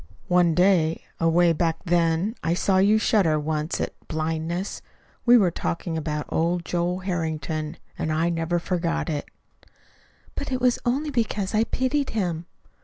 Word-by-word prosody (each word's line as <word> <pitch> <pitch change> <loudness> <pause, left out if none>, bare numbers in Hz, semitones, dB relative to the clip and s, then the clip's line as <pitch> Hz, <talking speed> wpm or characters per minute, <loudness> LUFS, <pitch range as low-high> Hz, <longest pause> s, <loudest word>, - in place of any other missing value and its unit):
One 175 -2 +4
day, 180 -3 +3 0.2
away 165 +1 +4
back 165 0 0
then, 170 +3 +2
I 165 +1 +1
saw 190 +1 +2
you 205 +3 +5
shudder 190 -8 +2
once 150 +1 -2
at - - -2
blindness. 160 +3 -3 0.5
We 245 +1 +8
were 190 -6 +3
talking 155 - -3
about 150 -1 -2
old 170 +1 0
Joe 175 +1 -1
Harrington. 160 -4 -3 0.2
And 155 - -1
I 160 +2 +1
never 165 +1 0
forgot 170 -1 -1
it." 145 -2 -4 1.0
"But 285 - -5
it 255 - 0
was 250 -1 +2
only 285 +5 0
because 215 -6 -1
I 220 +1 +3
pitied 260 +3 0
him." 175 -4 -2
170 Hz, 150 wpm, -24 LUFS, 160-195 Hz, 1.0 s, We